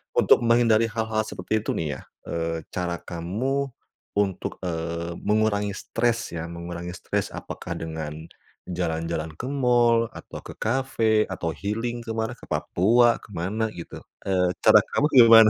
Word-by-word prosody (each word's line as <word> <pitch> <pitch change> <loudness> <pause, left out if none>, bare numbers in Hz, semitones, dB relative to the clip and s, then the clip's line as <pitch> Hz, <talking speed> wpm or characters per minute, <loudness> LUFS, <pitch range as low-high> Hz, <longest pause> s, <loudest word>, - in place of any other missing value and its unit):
untuk - - +6
menghindari 115 -1 +5
hal-hal 110 -1 -1
seperti 110 +4 -1
itu 105 - -2
nih 75 -4 -2
ya, - - -11 0.3
eee, 85 0 -1 0.2
cara 90 -1 -2
kamu 110 +12 -1 0.5
untuk, 100 -3 -1
eee, 85 0 -3
mengurangi 105 -1 +1
stres 115 +1 -1
ya, 80 - -3
mengurangi 85 +1 -6
stres - - -2
apakah - - -6
dengan 80 -2 -4 0.6
jalan-jalan 80 -2 -2
ke 120 +11 -5
mall, 120 -4 +4
atau - - -9
ke - - -7
cafe, 115 -3 +2
atau 90 -3 -3
healing 115 +6 -3
ke 115 - -3
mana, 115 +2 -2
ke - - -13
Papua, 115 +5 +3
ke 100 - -15
mana 95 +6 -1
gitu? 85 - -8 0.2
Eee, 90 -2 +1
cara - - +8 0.2
kamu 145 - +3
gimana? 115 -2 +10
105 Hz, 145 wpm, -25 LUFS, 85-115 Hz, 0.6 s, gimana